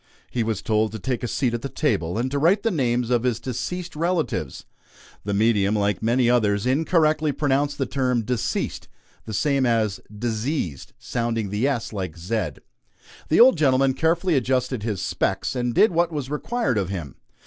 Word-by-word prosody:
He 120 - -1
was 110 -3 -2
told 110 -1 +1
to - - -4
take 125 +4 -2
a 120 - -2
seat 125 0 0
at 120 - -2
the 140 - -4
table, 90 - -1
and 125 +3 -1
to 140 - 0
write 180 +7 +3
the 225 - +1
names 125 -6 0
of 120 -2 +3
his 120 -2 0
deceased 170 +9 -4
relatives. 170 +1 -2 0.6
The 100 - -1
medium, 105 -1 +2
like 100 -3 0
many 120 +2 +2
others, 105 -4 +2
incorrectly 155 +2 +2
pronounced 145 0 0
the 135 - 0
term 125 -2 0
"deceased," 125 0 -2 0.4
the 110 - -6
same 140 +1 +1
as 110 -4 +1
"diseased" 110 - -3
sounding 115 -4 -2
the 105 +6 +1
s 125 -6 -2
like 95 -5 -4
z. 95 +3 -1 0.8
The 160 - +3
old 245 -8 +7
gentleman 135 -2 +3
carefully 165 +5 +1
adjusted 130 -2 0
his 105 -3 -3
"specs" - - -1
and 120 -1 0
did 210 - +4
what 170 0 +1
was 145 -3 -4
required 150 - -1
of 95 -2 -2
him. 85 -9 -6
125 Hz, 180 wpm, -23 LUFS, 110-145 Hz, 0.8 s, old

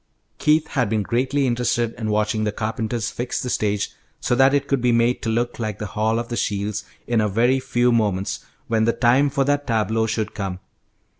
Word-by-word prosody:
Keith 155 +1 +3
had 125 -7 0
been 110 -1 0
greatly 130 +5 0
interested 120 -1 0
in 110 -2 -4
watching 105 +1 +1
the 105 - 0
carpenters 110 +1 -2
fix 120 +1 -3
the 125 - -3
stage 105 -1 0 0.3
so - - 0
that 135 +2 +5
it 140 -1 +1
could 140 -3 +1
be 125 0 +3
made 120 +1 +2
to 115 - -2
look 120 +2 -1
like 110 -3 -3
the 105 - -4
Hall 110 +1 +1
of 115 0 -3
the 120 - -2
Shields 105 -1 -2 0.2
in 120 -2 +1
a 105 - +1
very 120 +6 +2
few 120 -1 +1
moments, 100 -3 0 0.2
when 110 -2 +2
the 115 - +2
time 130 +4 +3
for 140 0 +1
that 145 +1 0
tableau 110 -1 +1
should 110 -1 -2
come. 95 -3 -4
115 Hz, 210 wpm, -22 LUFS, 110-125 Hz, 0.3 s, that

